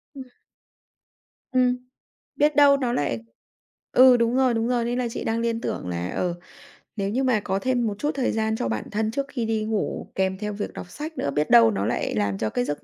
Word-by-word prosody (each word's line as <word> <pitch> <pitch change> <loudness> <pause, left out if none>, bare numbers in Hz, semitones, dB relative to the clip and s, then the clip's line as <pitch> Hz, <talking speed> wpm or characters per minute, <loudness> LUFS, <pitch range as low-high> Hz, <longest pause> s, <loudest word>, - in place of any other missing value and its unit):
Ừm. 265 -1 -8 1.3
Ừm, 250 -1 +2 0.6
biết 295 0 +2
đâu 285 -1 +6
nó 250 -3 -1
lại 140 - -1 0.7
ừ, 255 0 +7
đúng 235 +1 +1
rồi, 260 -2 +3
đúng 225 0 0
rồi, 240 -1 0
nên 240 +1 -1
là 245 - 0
chị - - -5
đang 225 +1 -1
liên 230 0 -1
tưởng - - -4
là, 90 +1 -3
ờ, 175 -1 -1 0.6
nếu 200 -2 -2
như 260 +5 0
mà 250 -4 +2
có 195 -1 -2
thêm 245 0 0
một 210 - -1
chút 295 +1 0
thời 265 -3 0
gian 220 0 0
cho 170 - -2
bản 110 -1 -3
thân 215 +1 -1
trước 275 +3 -2
khi 240 -4 -3
đi 220 -1 -1
ngủ, 215 -1 -3
kèm 190 0 0
theo 210 0 -4
việc 205 0 -5
đọc - - -8
sách 310 - -7
nữa, 140 - -1
biết 150 +2 -1
đâu 115 -1 +7
nó 100 0 -2
lại - - -1
làm 100 -2 0
cho 110 +1 -1
cái 125 - -1
giấc 145 +2 -4
225 Hz, 230 wpm, -24 LUFS, 180-250 Hz, 1.3 s, ừ